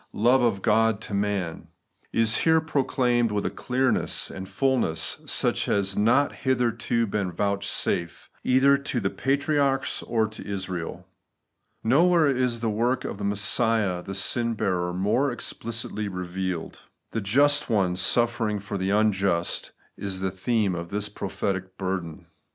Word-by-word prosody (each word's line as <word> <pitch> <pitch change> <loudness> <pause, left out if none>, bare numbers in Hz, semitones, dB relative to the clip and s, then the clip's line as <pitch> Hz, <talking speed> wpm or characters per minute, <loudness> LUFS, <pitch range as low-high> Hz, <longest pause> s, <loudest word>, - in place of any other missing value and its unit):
47 105 - -5
love 125 +2 +5
of 110 -5 +1
God 115 -1 +2
to 105 - -8
man, 100 -4 -2 0.2
— - - -40
\b 115 - +2
here 160 +9 +4
proclaimed 125 -6 +1
with 105 -1 -1
a - - -1
clearness 130 +1 0
and 95 0 -8
fulness 130 -12 0
such - - +1
as 100 -1 +1
had 105 - -1
not 130 +7 +3
hitherto 120 -3 0
been 100 -3 -2
vouchsafed 100 -2 -2 0.2
either 135 +2 +4
to 140 -3 -2
the 95 -3 -1
patriarchs 140 0 0
or 110 -2 0
to 110 - -10
Israel. 95 -4 -5 0.8
Nowhere 165 +7 +4
is 125 -2 0
the 115 - 0
work 120 +5 0
of 100 - -5
Messiah 100 -1 +1
the 95 +2 -6
sin 115 +4 +2
bearer 90 -4 -1
more 105 +10 +1
explicitly 115 -3 -3
revealed. 90 -1 -4 0.3
The 115 - -2
just 140 +10 +3
One 95 -5 +1
suffering 115 +2 +1
for 100 0 -5
the 95 +1 -1
imjust 100 -4 +1 0.3
is 95 -2 -4
the 95 0 -1
theme 100 +1 0
of 85 -1 -5
this 105 +2 -2
prophetic 95 -2 -4
burden. 95 -4 -4
105 Hz, 145 wpm, -25 LUFS, 95-120 Hz, 0.8 s, love